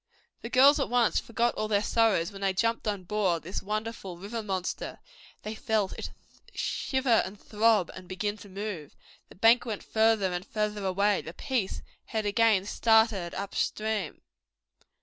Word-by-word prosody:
The 230 Hz, -, -6 dB
girls 275 Hz, +4 st, +6 dB
at 275 Hz, -, -1 dB
once 240 Hz, -1 st, +3 dB
forgot 235 Hz, +1 st, 0 dB
all 215 Hz, -, -2 dB
their 205 Hz, -1 st, +1 dB
sorrows 210 Hz, -7 st, +2 dB
when 195 Hz, 0 st, -10 dB
they 195 Hz, -1 st, +1 dB
jumped 230 Hz, +3 st, 0 dB
on 200 Hz, -3 st, -2 dB
board 185 Hz, -3 st, 0 dB
this 180 Hz, +4 st, -4 dB
wonderful 210 Hz, -3 st, -4 dB
river 210 Hz, +6 st, -5 dB
monster. 190 Hz, -4 st, -4 dB, 0.5 s
They 215 Hz, -, -4 dB
felt 220 Hz, -4 st, -1 dB
it -, -, -6 dB, 0.5 s
shiver 265 Hz, -4 st, +1 dB
and 195 Hz, +2 st, -8 dB
throb 215 Hz, -4 st, +2 dB
and 185 Hz, -1 st, -11 dB
begin 205 Hz, +3 st, -2 dB
to 205 Hz, -, -13 dB
move. 195 Hz, -6 st, -6 dB, 0.3 s
The -, -, -15 dB
bank 225 Hz, +5 st, +5 dB
went 220 Hz, -4 st, -5 dB
farther 220 Hz, -4 st, +2 dB
and 175 Hz, 0 st, -3 dB
farther 210 Hz, 0 st, -2 dB
away. 200 Hz, +2 st, +2 dB
The 165 Hz, -, -9 dB
Peace 250 Hz, -6 st, -2 dB, 0.2 s
had 220 Hz, -2 st, -3 dB
again 205 Hz, -2 st, +3 dB
started 220 Hz, -5 st, +2 dB
up 200 Hz, 0 st, -5 dB
stream. 215 Hz, -6 st, -2 dB
210 Hz, 165 wpm, -28 LUFS, 190-225 Hz, 0.5 s, girls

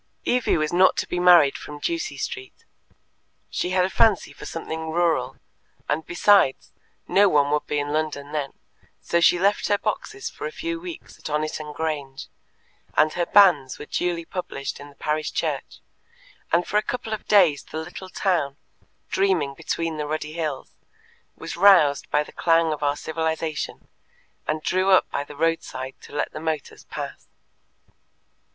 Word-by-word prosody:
Evie 250 Hz, -6 st, +2 dB
was 155 Hz, +1 st, -1 dB
not 185 Hz, +2 st, +5 dB
to -, -, -1 dB
be 180 Hz, -, -2 dB
married 175 Hz, -6 st, +6 dB
from 150 Hz, -, -8 dB
Ducie 335 Hz, -, -3 dB
Street. 390 Hz, +3 st, -6 dB, 0.9 s
She -, -, -1 dB
had 185 Hz, 0 st, +3 dB
a -, -, -2 dB
fancy 220 Hz, -5 st, +3 dB
for -, -, -10 dB
something 160 Hz, -1 st, -5 dB
rural, 170 Hz, 0 st, +1 dB, 0.5 s
and, 155 Hz, +2 st, 0 dB
besides, 175 Hz, -5 st, +3 dB, 0.3 s
no 200 Hz, +1 st, +5 dB
one 145 Hz, -3 st, +3 dB
would 150 Hz, 0 st, 0 dB
be 150 Hz, -, -1 dB
in 145 Hz, 0 st, -2 dB
London 150 Hz, -2 st, -2 dB
then, 145 Hz, -3 st, -3 dB, 0.5 s
so 170 Hz, -, +1 dB
she 175 Hz, -, +5 dB
left 200 Hz, +3 st, +2 dB
her 205 Hz, -, +3 dB
boxes 395 Hz, -, -4 dB
for -, -, -5 dB
a -, -, -6 dB
few 335 Hz, -4 st, -4 dB
weeks 350 Hz, 0 st, -9 dB
at -, -, -23 dB
Oniton 150 Hz, 0 st, -2 dB
Grange, 145 Hz, -3 st, -4 dB, 0.7 s
and 155 Hz, 0 st, +4 dB
her 175 Hz, -1 st, -1 dB
banns 175 Hz, -10 st, +5 dB
were -, -, -8 dB
duly 170 Hz, +1 st, -2 dB
published 170 Hz, -7 st, -5 dB
in 145 Hz, 0 st, -10 dB
the 140 Hz, -, -18 dB
parish 155 Hz, +1 st, -2 dB
church, -, -, -3 dB, 0.7 s
and 175 Hz, +1 st, +3 dB
for 210 Hz, -, 0 dB
a -, -, +4 dB
couple 230 Hz, -1 st, -4 dB
of 215 Hz, -, -6 dB
days 180 Hz, -9 st, +5 dB
the -, -, -8 dB
little 175 Hz, +4 st, -7 dB
town, 165 Hz, -9 st, 0 dB, 0.5 s
dreaming 185 Hz, -8 st, +1 dB
between 165 Hz, +3 st, -3 dB
the 150 Hz, -1 st, -3 dB
ruddy 155 Hz, 0 st, -3 dB
hills, 155 Hz, -5 st, -4 dB, 0.6 s
was -, -, -7 dB
roused 170 Hz, -7 st, +5 dB
by 150 Hz, -, +2 dB
the -, -, -14 dB
clang 165 Hz, -1 st, +3 dB
of 150 Hz, -, -7 dB
our 145 Hz, 0 st, +1 dB
civilization, 160 Hz, 0 st, -3 dB, 0.6 s
and 155 Hz, 0 st, -1 dB
drew 185 Hz, +1 st, +1 dB
up 185 Hz, -, +5 dB
by 140 Hz, -, -1 dB
the 145 Hz, 0 st, -12 dB
roadside 145 Hz, -4 st, -2 dB
to -, -, -13 dB
let 145 Hz, -, -2 dB
the -, -, -7 dB
motors 155 Hz, -3 st, -4 dB
pass. -, -, -7 dB
160 Hz, 170 wpm, -24 LUFS, 150-185 Hz, 0.9 s, married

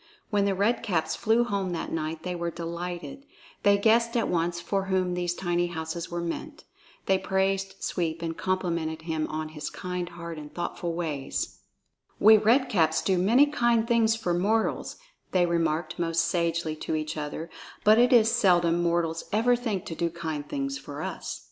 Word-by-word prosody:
When 205 Hz, -1 st, +2 dB
the 200 Hz, -1 st, +1 dB
Red 205 Hz, +6 st, +1 dB
Caps 170 Hz, -6 st, 0 dB
flew 225 Hz, +2 st, +2 dB
home 200 Hz, -5 st, -2 dB
that 165 Hz, -, -4 dB
night, 160 Hz, 0 st, -3 dB
they 180 Hz, -, -3 dB
were 170 Hz, -1 st, -2 dB
delighted; 175 Hz, -, -6 dB, 0.4 s
they 200 Hz, 0 st, +5 dB
guessed 230 Hz, +3 st, +3 dB
at 230 Hz, -, +1 dB
once 170 Hz, 0 st, 0 dB
for 195 Hz, +2 st, -1 dB
whom 185 Hz, -2 st, 0 dB
these 175 Hz, 0 st, -1 dB
tiny 175 Hz, -1 st, 0 dB
houses 165 Hz, 0 st, -5 dB
were 175 Hz, 0 st, -3 dB
meant. 300 Hz, -, -5 dB, 0.4 s
They 190 Hz, -1 st, +3 dB
praised 195 Hz, 0 st, 0 dB
Sweep 165 Hz, -2 st, -2 dB
and 165 Hz, -1 st, -3 dB
complimented 170 Hz, -4 st, -2 dB
him 160 Hz, -2 st, -2 dB
on 155 Hz, 0 st, -4 dB
his 150 Hz, -1 st, -6 dB
kind 180 Hz, -1 st, -4 dB
heart 170 Hz, -2 st, -7 dB
and 150 Hz, -1 st, -9 dB
his -, -, -26 dB
thoughtful 175 Hz, -1 st, -3 dB
ways. 150 Hz, -6 st, -3 dB, 0.6 s
"We 220 Hz, +1 st, +8 dB
Red 230 Hz, +5 st, +4 dB
Caps 160 Hz, -7 st, +2 dB
do 190 Hz, -2 st, +2 dB
many 230 Hz, +10 st, +5 dB
kind 235 Hz, -5 st, +1 dB
things 230 Hz, -2 st, +3 dB
for 185 Hz, -6 st, -1 dB
mortals," 210 Hz, +6 st, 0 dB, 0.4 s
they 180 Hz, -2 st, +4 dB
remarked 165 Hz, 0 st, -1 dB
most 165 Hz, -1 st, +1 dB
sagely 170 Hz, -2 st, 0 dB
to 160 Hz, -, -3 dB
each 155 Hz, 0 st, -3 dB
other, 150 Hz, +2 st, -5 dB, 0.3 s
"but 215 Hz, +2 st, +6 dB
it 245 Hz, +2 st, +5 dB
is 230 Hz, -2 st, +6 dB
seldom 175 Hz, -7 st, +3 dB
mortals 170 Hz, -1 st, 0 dB
ever 230 Hz, +4 st, +3 dB
think 225 Hz, -6 st, -3 dB
to -, -, -5 dB
do 170 Hz, +1 st, -1 dB
kind 160 Hz, -3 st, -5 dB
things 135 Hz, 0 st, -3 dB
for 145 Hz, +2 st, -7 dB
us. -, -, -5 dB
175 Hz, 180 wpm, -27 LUFS, 165-205 Hz, 0.6 s, We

